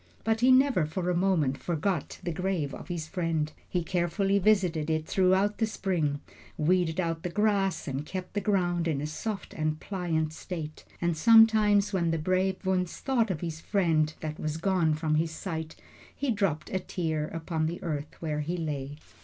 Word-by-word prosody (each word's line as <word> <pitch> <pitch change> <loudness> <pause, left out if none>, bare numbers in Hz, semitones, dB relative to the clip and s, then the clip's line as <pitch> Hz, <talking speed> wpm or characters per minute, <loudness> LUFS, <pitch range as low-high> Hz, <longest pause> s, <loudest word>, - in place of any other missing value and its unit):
But 225 +1 +1
he 255 +1 +6
never 255 - +4
for 180 +3 -2
a - - 0
moment 170 -7 +1
forgot 175 -1 -2
the 175 - -2
grave 180 -5 -1
of - - -8
his 170 -4 -4
friend. 160 -3 -1 0.2
He 180 -2 0
carefully 190 +4 +1
visited 180 -6 +2
it 155 -1 0
throughout 190 +3 +2
the 225 - +2
spring, 165 -9 -1 0.4
weeded 175 +1 +2
out 165 -2 -1
the 180 - -3
grass, 195 -3 +1
and 135 +1 -2
kept 185 +3 -6
the 205 - -1
ground 175 -4 +1
in 155 -4 0
a 145 - -3
soft 195 +7 -5
and 155 0 -1
pliant 165 -5 -2
state; 160 -3 -7 0.2
and 170 -1 +1
sometimes, 215 0 +5
when 170 -3 +1
the 165 - +1
brave 185 +4 0
Wunzh 185 -2 +1
thought 240 -5 0
of 175 -5 -2
his 160 -2 -4
friend 160 -7 +2
that 155 0 -5
was 155 0 -2
gone 170 -3 +2
from 155 0 -1
his 160 +2 +2
sight, 160 -1 -5 0.4
he 280 -3 -1
dropped 195 -8 -1
a 190 - 0
tear 160 -4 -2
upon 160 -1 -2
the 170 +2 -4
earth 150 -3 -4
where 155 -2 -2
he 165 +4 -2
lay. 145 -3 -4
175 Hz, 185 wpm, -28 LUFS, 155-195 Hz, 0.4 s, he